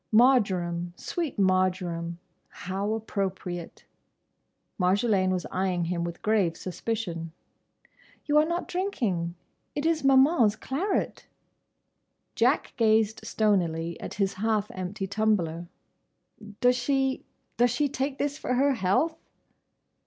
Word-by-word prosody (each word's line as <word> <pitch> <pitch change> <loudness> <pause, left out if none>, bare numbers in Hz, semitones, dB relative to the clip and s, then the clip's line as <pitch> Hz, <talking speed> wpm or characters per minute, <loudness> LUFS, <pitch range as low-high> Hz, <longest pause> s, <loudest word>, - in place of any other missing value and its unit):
Marjoram—sweet 200 - +1
Marjoram—how 185 +1 -1
appropriate!" 190 -5 -4 0.9
Marjolaine 190 +1 +2
was 185 -1 -1
eyeing 185 -2 0
him 170 0 -1
with 170 0 -6
grave 205 -6 +2
suspicion. 180 -4 -4 0.9
"You 295 0 +4
are 305 - +4
not 340 +2 -2
drinking. 210 - -1 0.4
It 290 - -2
is 325 -2 +1
Maman's 265 -5 +5
claret!" 285 - -2 1.1
Jack - - +2
gazed 220 -2 +3
stonily 175 -7 0
at - - -7
his 195 -1 0
half 210 +1 0
empty 185 +1 -4
tumbler. 190 -5 0 0.9
"Does 250 0 +4
she—does 265 -1 -1
she 250 +5 +1
take 270 0 -2
this 285 0 -2
for 250 - -1
her 275 +2 +3
health?" 235 - +1
205 Hz, 100 wpm, -27 LUFS, 180-255 Hz, 1.1 s, Maman's